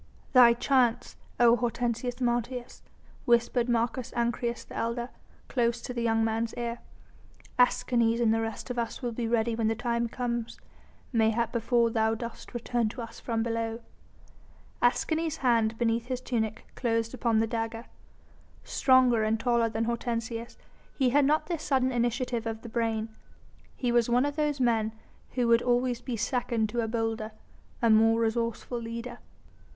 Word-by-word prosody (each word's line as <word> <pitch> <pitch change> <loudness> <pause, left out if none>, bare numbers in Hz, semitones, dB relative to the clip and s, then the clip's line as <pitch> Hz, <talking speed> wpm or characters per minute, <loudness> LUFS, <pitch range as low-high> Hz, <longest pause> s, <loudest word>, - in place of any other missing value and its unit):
"Thy 245 -2 +8
chance, 245 -1 +1 0.2
O 240 -1 +6
Hortensius 240 +1 -2
Martius," 240 0 -2 0.4
whispered 235 +1 +2
Marcus 240 +1 0
Ancyrus, 235 0 -1
the - - -12
elder, 235 +1 -2 0.4
close 235 -2 0
to 250 - -5
the 240 - -3
young 225 -1 +2
man's 225 +1 -1
ear. 235 0 -3 0.8
"Escanes 235 -2 +3
and 225 -2 +3
the 225 - +1
rest 225 +3 -4
of 245 - -2
us 235 +3 -4
will 240 - -1
be 230 0 -3
ready 230 0 +1
when 225 -1 0
the 225 - +1
time 235 0 -1
comes, 235 -1 -3 0.5
mayhap 225 0 +2
before 235 0 +2
thou 220 0 +1
dost 235 +2 -8
return 240 -1 0
to 240 - -9
us 230 -1 -7
from 225 -2 -1
below." 230 0 -2 1.0
Escanes' 315 +6 +1
hand 230 -2 +3
beneath 230 0 0
his 255 -1 -2
tunic 220 -4 -2
closed 230 -1 -1
upon 235 -3 +1
the 225 - +3
dagger. 225 0 -3 0.8
Stronger 255 -4 +4
and 215 +1 +1
taller 235 -1 +2
than 220 +1 -2
Hortensius, 230 0 -3 0.4
he 260 -3 +2
had 285 +1 +4
not 305 +3 +2
the 340 -3 -3
sudden 260 -3 +1
initiative 240 -1 -1
of 225 0 -5
the 235 - -7
brain. 225 -1 -1 0.7
He 245 -2 -1
was 240 -1 +3
one 245 +3 +3
of 290 0 -2
those 295 -2 0
men 225 -3 +1 0.4
who 245 -2 +1
would 230 0 +5
always 245 0 +1
be 245 -1 -4
second 230 -1 0
to 235 +2 -1
a 225 - -1
bolder, 225 -1 -2 0.5
a 230 - +5
more 225 +1 +5
resourceful 230 +1 -1
leader. 235 +1 -6
235 Hz, 160 wpm, -28 LUFS, 225-245 Hz, 1.0 s, Thy